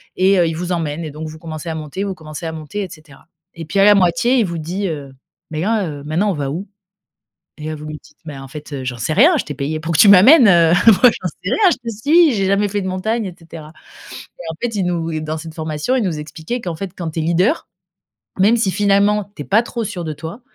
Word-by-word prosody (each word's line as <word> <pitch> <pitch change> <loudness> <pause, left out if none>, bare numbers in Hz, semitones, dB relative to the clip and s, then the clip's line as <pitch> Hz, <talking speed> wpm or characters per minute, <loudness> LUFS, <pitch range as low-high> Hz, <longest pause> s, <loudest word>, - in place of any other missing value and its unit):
et 190 +1 +3
heu, 170 - +3
il 165 - -2
vous 180 +1 -4
emmène 165 -2 -2
et 150 - -6
donc 155 +2 -7
vous 155 - -10
commencez 160 0 -7
à 160 - -3
monter, 155 +5 -5
vous 195 -2 -3
commencez 155 0 -8
à - - -3
monter 160 +6 -5
et 185 - -7
cetera. 155 -2 -16 0.3
Et 165 -1 -8
puis, 165 +6 -4
à 195 - +6
la 210 - +8
moitié, 190 +8 +2
il 225 - +2
vous 170 -1 -4
dit, 180 +5 -3
heu: 145 -4 -6 0.4
"Mais 155 0 -3
là, 210 0 0
heu, 145 -2 -7
maintenant, 170 +8 0
on - - -2
va 140 -3 -3
où?". 180 +8 -5 1.0
Et - - -5
là, 155 - -3
vous 150 0 -9
lui 155 -1 -7
dites: 150 - -21
"Mais, 150 -3 -8
en 135 0 -10
fait, 150 +1 -10
heu, 135 -2 -5
j'en 125 -1 -4
sais 115 +7 -2
rien, 305 - +5
je - - -1
t'ai - - -6
payé 150 +3 -3
pour 165 +1 -3
que 155 - 0
tu 205 - +7
m'amènes, 225 - +8
heu, 170 -3 +5
moi, 200 -5 +6
j'en 185 - -4
sais 180 +3 -7
rien, 395 -5 +4
je - - -2
te 230 - -3
suis, 305 +7 +4
j'ai 195 -3 0
jamais 200 +1 +2
fait 205 +1 -2
de 190 - -4
montagne!" 215 +5 -2
et 180 - -7
cetera». 165 -2 -11 0.7
Et, 175 - -8
en 160 - -9
fait, 240 -2 -2
il 195 - 0
nous 165 -2 -2
et 155 -1 -3
dans 155 +1 -4
cette 160 0 -9
formation, 155 - -2
ils 255 - +1
nous 175 -6 -2
expliquaient 160 +10 -5
qu'en 175 -5 -4
fait, 195 +2 -6
quand 165 -3 -4
tu 160 - -4
es - - 0
leader, 180 - +1 0.7
même 215 +5 +4
si 195 -4 +1
finalement, 205 +1 +2
tu 145 - -6
es - - -14
pas 215 +4 +3
trop 235 -1 -4
sûr 195 -4 -5
de 155 - -4
toi, 160 - -8
170 Hz, 275 wpm, -18 LUFS, 155-200 Hz, 1.0 s, la